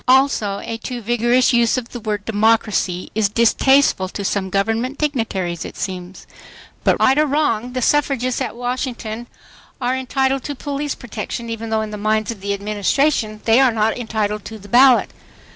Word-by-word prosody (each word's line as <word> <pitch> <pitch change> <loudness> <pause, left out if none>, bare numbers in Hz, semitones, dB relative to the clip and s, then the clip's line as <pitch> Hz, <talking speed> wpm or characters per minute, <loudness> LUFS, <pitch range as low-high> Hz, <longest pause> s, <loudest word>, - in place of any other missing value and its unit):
Also 255 -6 +3
a 230 - -4
too 245 +1 -5
vigorous 240 +3 +2
use 235 +1 +3
of 240 -2 -4
the 240 - -7
word 210 -2 -3
"democracy" 215 -4 +1
is 215 -2 +1
distasteful 235 -2 +3
to 200 +1 -5
some 190 -1 -1
government 225 +7 -1
dignitaries, 220 - -2
it - - -9
seems. 185 -1 -6 0.6
But - - +2
right 265 +3 +4
or 305 - +3
wrong, 250 -5 0
the 255 -1 -2
suffragists 270 -3 +1
at - - -3
Washington 245 -2 -4 0.5
are 250 0 0
entitled 265 +1 0
to 290 - -4
police 285 +1 -3
protection, 230 0 -6
even 225 0 -5
though 220 0 0
in 215 - -6
the 210 - -5
minds 215 +1 0
of 215 -4 -9
the 200 0 -1
Administration 215 +3 0
they 225 +2 +5
are 265 -2 +5
not 220 0 +1
entitled 215 -3 -2
to 220 - -7
the 205 -1 -13
ballot. 255 +3 +5
230 Hz, 175 wpm, -20 LUFS, 210-255 Hz, 0.6 s, they